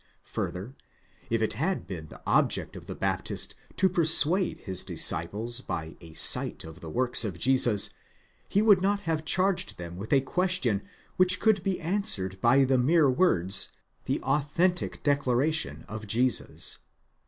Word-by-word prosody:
Further, 100 Hz, +8 st, -5 dB, 0.6 s
if 115 Hz, -1 st, 0 dB
it 110 Hz, -, -1 dB
had 165 Hz, -, -2 dB
been 85 Hz, -4 st, -8 dB
the -, -, -15 dB
object -, -, +1 dB
of -, -, -11 dB
the -, -, -7 dB
Baptist -, -, -2 dB, 0.2 s
to 190 Hz, -, +3 dB
persuade 170 Hz, +1 st, +3 dB
his 95 Hz, -3 st, -3 dB
disciples 110 Hz, +9 st, 0 dB
by 80 Hz, -8 st, -6 dB
a 80 Hz, -2 st, -13 dB
sight -, -, +3 dB
of 80 Hz, +2 st, -12 dB
the 80 Hz, -, -8 dB
works 125 Hz, +8 st, +2 dB
of 100 Hz, -6 st, -5 dB
Jesus, 120 Hz, -2 st, +3 dB, 0.6 s
he 205 Hz, -, +1 dB
would 205 Hz, -4 st, +5 dB
not 200 Hz, +1 st, 0 dB
have 165 Hz, -4 st, -3 dB
charged 185 Hz, +2 st, 0 dB
them 85 Hz, 0 st, -8 dB
with 100 Hz, +4 st, -8 dB
a 140 Hz, -, +5 dB
question 155 Hz, -, 0 dB, 0.4 s
which 185 Hz, 0 st, +3 dB
could 220 Hz, -4 st, +2 dB
be 190 Hz, 0 st, -2 dB
answered 160 Hz, -, -1 dB
by 130 Hz, +4 st, +4 dB
the 130 Hz, -1 st, +1 dB
mere 145 Hz, +2 st, +3 dB
words, 100 Hz, -, +2 dB, 0.3 s
the -, -, -2 dB
authentic 150 Hz, +6 st, -1 dB
declaration 140 Hz, -, -1 dB
of 110 Hz, 0 st, -8 dB
Jesus. 120 Hz, +4 st, 0 dB
130 Hz, 155 wpm, -27 LUFS, -, 0.6 s, would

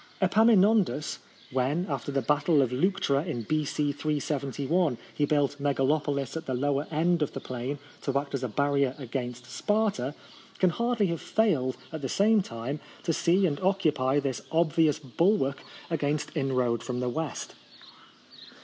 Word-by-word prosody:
Epaminondas, 205 Hz, -4 st, +3 dB, 0.3 s
when, 135 Hz, +7 st, 0 dB
after 140 Hz, -1 st, -3 dB
the 135 Hz, -2 st, 0 dB
battle 150 Hz, +2 st, +3 dB
of 125 Hz, -, -2 dB
Leuctra 145 Hz, -1 st, +1 dB
in 140 Hz, -10 st, -4 dB
B.C. 150 Hz, +2 st, 0 dB
371, 145 Hz, +1 st, -1 dB, 0.2 s
he 145 Hz, -, +1 dB
built 145 Hz, -1 st, 0 dB
Megalopolis 140 Hz, 0 st, 0 dB
at 160 Hz, 0 st, -5 dB
the 130 Hz, -, -1 dB
lower 145 Hz, +3 st, 0 dB
end 170 Hz, +2 st, +1 dB
of 150 Hz, -, -1 dB
the -, -, -4 dB
plain 130 Hz, +3 st, -4 dB, 0.2 s
to 140 Hz, -1 st, 0 dB
act 140 Hz, 0 st, -3 dB
as 135 Hz, -, -1 dB
a -, -, 0 dB
barrier 140 Hz, +2 st, +1 dB
against 125 Hz, -2 st, -5 dB
Sparta, 200 Hz, -, 0 dB, 0.4 s
can 185 Hz, -2 st, +3 dB
hardly 235 Hz, +1 st, +1 dB
have 170 Hz, -3 st, -2 dB
failed 155 Hz, -, +1 dB, 0.2 s
at 160 Hz, -, -4 dB
the 135 Hz, -, -3 dB
same 210 Hz, -, +4 dB
time 125 Hz, -1 st, -5 dB, 0.2 s
to 165 Hz, -, 0 dB
see 180 Hz, +5 st, +3 dB
and 145 Hz, -5 st, 0 dB
occupy 155 Hz, -8 st, +2 dB
this 135 Hz, -3 st, -2 dB
obvious 160 Hz, -2 st, +3 dB
bulwark 140 Hz, -, +1 dB, 0.3 s
against 150 Hz, 0 st, -1 dB
inroad 130 Hz, -5 st, +1 dB
from 125 Hz, 0 st, -4 dB
the 125 Hz, -, -1 dB
west. 155 Hz, +5 st, -4 dB
145 Hz, 150 wpm, -28 LUFS, 135-170 Hz, 0.4 s, same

